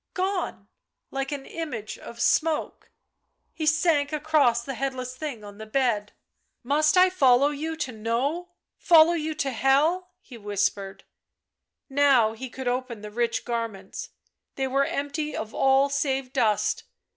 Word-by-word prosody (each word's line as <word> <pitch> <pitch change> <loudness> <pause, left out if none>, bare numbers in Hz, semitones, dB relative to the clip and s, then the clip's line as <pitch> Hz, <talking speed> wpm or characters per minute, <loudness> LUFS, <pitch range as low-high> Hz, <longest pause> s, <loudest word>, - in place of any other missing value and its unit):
Gone 375 0 -2 0.2
— - - -57
like 270 0 -3
an 280 -2 -5
image 255 -11 -6
of 235 - -11
smoke. 315 +5 0 0.6
He 310 -2 -3
sank 310 -2 +2
across 295 -6 +2
the 270 - -5
headless 255 -1 -4
thing 265 -6 -6
on 205 0 -11
the 220 - -8
bed. 215 -4 0 0.3
" - - -49
Must 305 +3 +3
I 370 0 +6
follow 275 -5 +4
you 315 +3 -4
to 275 -5 -3
know, 250 +11 -2 0.3
follow 330 0 +6
you 315 -2 -2
to 275 -2 -1
hell 275 +8 +3
V 370 - -25
' - - -56
he 245 - -9
whispered. 205 -1 -2 0.8
Now 270 -6 +4
he 255 +3 -7
could 260 +1 -7
open 245 -3 -2
the 210 0 -8
rich 235 +1 -1
garments. 230 -5 -4 0.5
They 270 - -1
were 275 +1 +1
empty 285 +2 -3
of 220 0 -5
all 270 +1 +4
save 270 -2 -1
dust. 215 -5 +1
270 Hz, 155 wpm, -26 LUFS, 235-305 Hz, 0.8 s, I